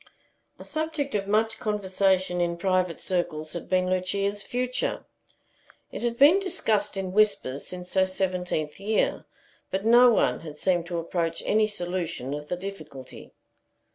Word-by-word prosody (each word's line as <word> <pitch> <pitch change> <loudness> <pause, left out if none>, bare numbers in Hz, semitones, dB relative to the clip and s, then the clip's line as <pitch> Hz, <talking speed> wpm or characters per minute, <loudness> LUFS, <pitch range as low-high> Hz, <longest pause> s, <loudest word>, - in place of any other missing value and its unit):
A - - -11
subject 310 -3 -3
of 200 -2 -1
much 220 +2 +1
conversation 190 -3 +1
in 170 0 0
private 185 -1 0
circles 165 -4 -2
had 170 - -7
been 185 -1 +2
Lucia's 195 +2 -1
future. 250 +3 -2 0.9
It - - -6
had 235 -1 -1
been 295 +9 +7
discussed 225 - 0
in 190 -1 -3
whispers 200 -10 +1
since 180 0 -6
her 190 -1 +3
seventeenth 180 -5 -2
year, 210 +2 0 0.4
but 195 +2 -2
no 240 +2 +7
one 125 - +2
had 155 -2 -9
seemed 175 0 +1
to 175 -1 -3
approach 165 0 -2
any 215 0 +3
solution 175 -8 -3
of 150 0 -6
the 180 - -3
difficulty. 155 -9 -9
185 Hz, 145 wpm, -26 LUFS, 175-215 Hz, 0.9 s, been